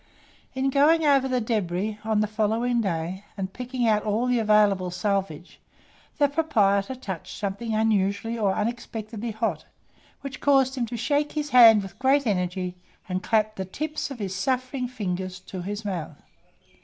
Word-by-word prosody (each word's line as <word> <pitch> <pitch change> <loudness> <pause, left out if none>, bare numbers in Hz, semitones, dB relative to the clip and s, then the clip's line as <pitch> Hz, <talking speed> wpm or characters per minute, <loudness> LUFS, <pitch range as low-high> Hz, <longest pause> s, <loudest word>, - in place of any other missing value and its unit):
In 265 +1 0
going 310 +4 +4
over 275 -2 +4
the 255 -1 0
débris 210 -2 -2
on 220 -1 +1
the - - +2
following 225 +3 0
day, 180 0 -3
and 190 -1 -4
picking 250 -1 -2
out 210 -1 +3
all 215 +3 0
the 250 -1 +2
available 210 -4 +3
salvage, 185 -3 -3 0.6
the 290 -2 +4
proprietor 260 -8 +1
touched 195 -10 -7
something 210 +3 -3
unusually 215 +1 +1
or 210 -4 +1
unexpectedly 225 0 -4
hot, 215 -8 -2 0.6
which 275 -1 -7
caused 270 -2 +4
him 250 -3 -2
to 235 +1 -5
shake 290 +5 0
his 295 -1 -3
hand 225 -4 +8
with 195 +2 -11
great 270 +1 +3
energy, 180 -3 -1 0.3
and 185 0 -2
clap 215 +2 +1
the 190 - -2
tips 305 +13 -4
of 275 - -7
his 195 -4 -4
suffering 255 +4 -1
fingers 185 -6 -4
to 185 0 -7
his 205 +4 -5
mouth. 165 -7 -4
215 Hz, 160 wpm, -25 LUFS, 195-255 Hz, 0.6 s, hand